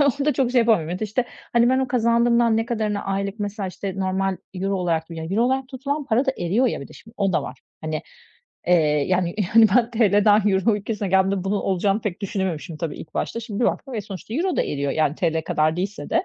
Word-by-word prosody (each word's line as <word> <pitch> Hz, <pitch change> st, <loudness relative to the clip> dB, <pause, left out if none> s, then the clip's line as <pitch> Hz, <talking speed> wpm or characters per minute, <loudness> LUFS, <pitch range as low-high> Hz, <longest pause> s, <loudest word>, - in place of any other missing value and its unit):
onu 285 Hz, 0 st, +2 dB
da 300 Hz, -, +4 dB
çok 265 Hz, -4 st, +1 dB
şey 250 Hz, -, +3 dB
yapamıyorum. 180 Hz, -8 st, +2 dB
İşte, 220 Hz, +3 st, -1 dB, 0.3 s
hani 235 Hz, 0 st, +4 dB
ben 260 Hz, -, +3 dB
o 265 Hz, -1 st, 0 dB
kazandığımdan 235 Hz, -1 st, +3 dB
ne 225 Hz, +1 st, 0 dB
kadarını 215 Hz, -4 st, -2 dB
aylık 195 Hz, +1 st, -2 dB
mesela, 205 Hz, -1 st, -3 dB
işte, 190 Hz, +1 st, -5 dB
normal 190 Hz, 0 st, -1 dB, 0.2 s
euro 195 Hz, +2 st, -1 dB
olarak; 170 Hz, -3 st, 0 dB
yani 160 Hz, +1 st, -6 dB
euro 225 Hz, -, +3 dB
olarak 260 Hz, +1 st, 0 dB
tutulan 280 Hz, +2 st, -3 dB
para 250 Hz, +2 st, +1 dB
da 265 Hz, -, +2 dB
eriyor 200 Hz, +9 st, +1 dB
ya -, -, -1 dB
bir 140 Hz, -, -9 dB
de -, -, -14 dB
şimdi 225 Hz, +1 st, -16 dB
o 195 Hz, -2 st, +1 dB
da -, -, +1 dB
var. 130 Hz, -, -8 dB, 0.2 s
Hani, 155 Hz, 0 st, -3 dB, 0.6 s
eee, 180 Hz, -, +5 dB, 0.3 s
yani 180 Hz, -2 st, +1 dB, 0.2 s
yani 225 Hz, -1 st, +8 dB
ben 240 Hz, -1 st, +3 dB
TL'den 210 Hz, -2 st, +4 dB
euro 195 Hz, +3 st, +2 dB
ülkesine 210 Hz, -1 st, -3 dB
geldiğimde 190 Hz, 0 st, +2 dB
bunun 200 Hz, +1 st, 0 dB
olacağını 195 Hz, +2 st, 0 dB
pek 205 Hz, -3 st, -4 dB
düşünememişim 185 Hz, -5 st, -3 dB
tabii 155 Hz, -1 st, -4 dB
ilk 155 Hz, -, -11 dB
başta. 230 Hz, -, -2 dB
Şimdi 225 Hz, -1 st, -5 dB
bir -, -, +3 dB
baktım 270 Hz, -3 st, -2 dB
ve 220 Hz, -, -1 dB
sonuçta 200 Hz, +2 st, -8 dB
euro 350 Hz, +5 st, 0 dB
da -, -, +3 dB
eriyor 140 Hz, -1 st, -2 dB
yani 155 Hz, -2 st, +1 dB
TL 160 Hz, -1 st, 0 dB
kadar 155 Hz, +1 st, +1 dB
değilse 195 Hz, +3 st, -4 dB
de. 345 Hz, +3 st, +2 dB
205 Hz, 225 wpm, -23 LUFS, 185-235 Hz, 0.6 s, yani